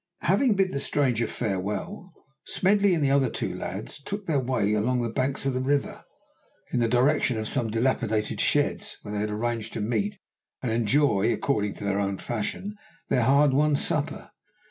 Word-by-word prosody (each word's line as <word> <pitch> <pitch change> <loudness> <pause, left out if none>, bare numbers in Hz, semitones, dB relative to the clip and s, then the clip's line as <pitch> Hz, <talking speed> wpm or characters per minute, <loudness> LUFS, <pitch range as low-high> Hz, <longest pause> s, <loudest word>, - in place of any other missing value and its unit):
Having 205 - +3
bid 190 -1 +2
the 140 - -2
stranger 125 -6 +1
farewell, 105 - -3 0.4
Smedley 200 0 +3
and 160 - 0
the 135 - +2
other 135 -2 +3
two - - -3
lads - - -6
took 200 +6 -5
their 155 -5 +1
way 120 -5 0
along 120 +4 +1
the 115 -1 -3
banks 135 +2 -1
of 135 - +1
the 130 - -1
river, 140 +1 -1 0.7
in - - +2
the 120 - +2
direction 125 +1 +2
of 110 0 -3
some 120 -3 0
dilapidated 115 -2 0
sheds, - - 0
where 105 - -6
they 105 - -1
had 105 +1 -1
arranged 115 +1 -3
to - - -4
meet 195 - -1 0.5
and 120 - -1
enjoy, 115 -1 +2
according 105 -8 0
to - - -9
their 100 0 0
own 100 -1 -1
fashion, 120 - -4 0.4
their 130 - +3
hard 140 +4 +4
won 150 +2 +3
supper. - - -1
125 Hz, 180 wpm, -26 LUFS, 110-145 Hz, 0.7 s, hard